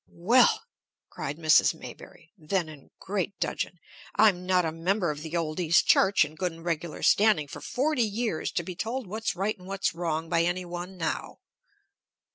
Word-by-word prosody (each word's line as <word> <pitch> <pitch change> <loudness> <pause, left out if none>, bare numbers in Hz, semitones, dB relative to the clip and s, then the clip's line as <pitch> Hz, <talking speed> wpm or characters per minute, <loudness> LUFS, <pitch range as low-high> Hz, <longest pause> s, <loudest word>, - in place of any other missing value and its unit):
"Well!" 245 - +5 0.5
cried 145 +2 -5
Mrs. 155 -2 +4
Maybury, 165 - -12
then 175 0 -2
in 145 -3 -13
great 200 0 -3
dudgeon. 175 - -2 0.4
"I'm 185 -4 +3
not 180 -2 +3
a 160 - -1
member 175 +2 0
of 150 0 -7
the 160 +2 -3
old 155 0 -2
East 170 -1 +3
Church 195 -5 +5
in 150 - -10
good 180 +2 -2
and 165 +1 -13
regular 165 -1 -3
standing 205 -8 +4
for - - -9
forty 270 +3 0
years 220 -5 -1
to 175 - -1
be 180 +1 -7
told 230 +7 -3
what's 215 +2 -3
right 200 +4 -1
and 180 - -13
what's 195 0 -1
wrong 165 -1 -2
by 165 +1 +2
any 180 +2 -1
one 175 +2 -7
now!" 165 - -3
180 Hz, 180 wpm, -27 LUFS, 165-200 Hz, 0.5 s, Well